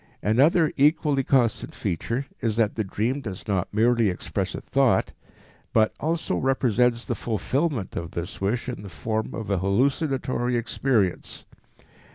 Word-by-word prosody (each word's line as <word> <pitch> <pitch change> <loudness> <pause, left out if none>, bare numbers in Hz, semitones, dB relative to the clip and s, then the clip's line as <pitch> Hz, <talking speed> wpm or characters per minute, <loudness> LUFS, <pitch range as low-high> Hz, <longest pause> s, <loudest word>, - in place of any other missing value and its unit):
Another 145 - +4
equally 145 -1 +3
constant 125 -5 +1
feature 115 - -2
is 115 -4 -1
that 110 -2 +2
the 110 - -1
dream 115 +8 -1
does 95 -5 -7
not 95 -4 -1
merely 115 0 +3
express 90 - -3
a - - -5
thought, - - +2 0.6
but 110 -1 +3
also 160 - -1
represents 125 -1 +1
the - - -1
fulfillment 125 - -2
of 85 -1 -4
this 85 +6 -6
wish 110 +6 -1
in 125 -5 -5
the 100 - -9
form 110 +6 -3
of 110 -2 -4
a 100 - +1
hallucinatory 130 - 0
experience. 115 -4 -1
115 Hz, 145 wpm, -25 LUFS, 105-135 Hz, 0.6 s, Another